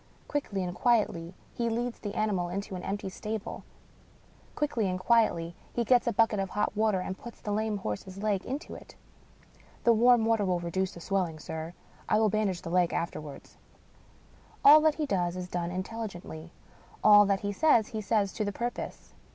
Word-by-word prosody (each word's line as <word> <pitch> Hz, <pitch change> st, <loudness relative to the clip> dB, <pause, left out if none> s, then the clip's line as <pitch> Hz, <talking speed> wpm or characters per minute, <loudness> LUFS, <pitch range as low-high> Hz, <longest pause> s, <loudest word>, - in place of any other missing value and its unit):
Quickly 210 Hz, -10 st, -2 dB
and 175 Hz, -1 st, -3 dB
quietly, 185 Hz, -6 st, +1 dB, 0.2 s
he 235 Hz, -1 st, -1 dB
leads 235 Hz, +1 st, -2 dB
the 205 Hz, -2 st, -6 dB
ani 215 Hz, 0 st, +1 dB
mal 175 Hz, -3 st, -1 dB
into 195 Hz, +2 st, -4 dB
an 180 Hz, -, -5 dB
empty 200 Hz, 0 st, -4 dB
stable; 215 Hz, +3 st, -5 dB, 0.9 s
quickly 235 Hz, -9 st, 0 dB
and 185 Hz, 0 st, -2 dB
quietly, 185 Hz, -6 st, +2 dB, 0.2 s
he 240 Hz, -, 0 dB
gets 245 Hz, +1 st, +3 dB
a -, -, +3 dB
bucket 220 Hz, -1 st, +2 dB
of 195 Hz, -1 st, -2 dB
hot 210 Hz, +1 st, -1 dB
water, 215 Hz, -2 st, +2 dB
and 190 Hz, +1 st, -5 dB
puts 235 Hz, -, -10 dB
the 210 Hz, -, -5 dB
lame 215 Hz, 0 st, 0 dB
horse's 185 Hz, -, -5 dB
leg 205 Hz, -1 st, 0 dB
into 280 Hz, +5 st, -5 dB
it. -, -, -12 dB, 0.9 s
"The 235 Hz, -, +6 dB
warm 235 Hz, 0 st, +5 dB
water 225 Hz, -2 st, +2 dB
will 180 Hz, -2 st, +1 dB
reduce 185 Hz, +2 st, -2 dB
the 170 Hz, -, -10 dB
swelling, 180 Hz, -4 st, -1 dB
sir. 160 Hz, +2 st, -6 dB, 0.3 s
I 215 Hz, -, +4 dB
will 220 Hz, -1 st, +3 dB
bandage 200 Hz, -4 st, -1 dB
the 165 Hz, -, -5 dB
leg 180 Hz, -1 st, +2 dB
afterwards." 150 Hz, -4 st, -5 dB, 1.1 s
All 300 Hz, +2 st, +10 dB
that 310 Hz, -1 st, +3 dB
he 310 Hz, -, -1 dB
does 180 Hz, -8 st, 0 dB
is 180 Hz, -1 st, -5 dB
done 175 Hz, -1 st, -3 dB
intelligently; 180 Hz, -4 st, -6 dB, 0.5 s
all 205 Hz, -1 st, +8 dB
that 195 Hz, -1 st, +1 dB
he 205 Hz, -, -2 dB
says, 235 Hz, -4 st, +3 dB
he 220 Hz, -, -4 dB
says 205 Hz, -2 st, +1 dB
to 215 Hz, -, -2 dB
the 205 Hz, -, -2 dB
purpose. 240 Hz, +4 st, -5 dB
205 Hz, 185 wpm, -29 LUFS, 180-225 Hz, 1.1 s, All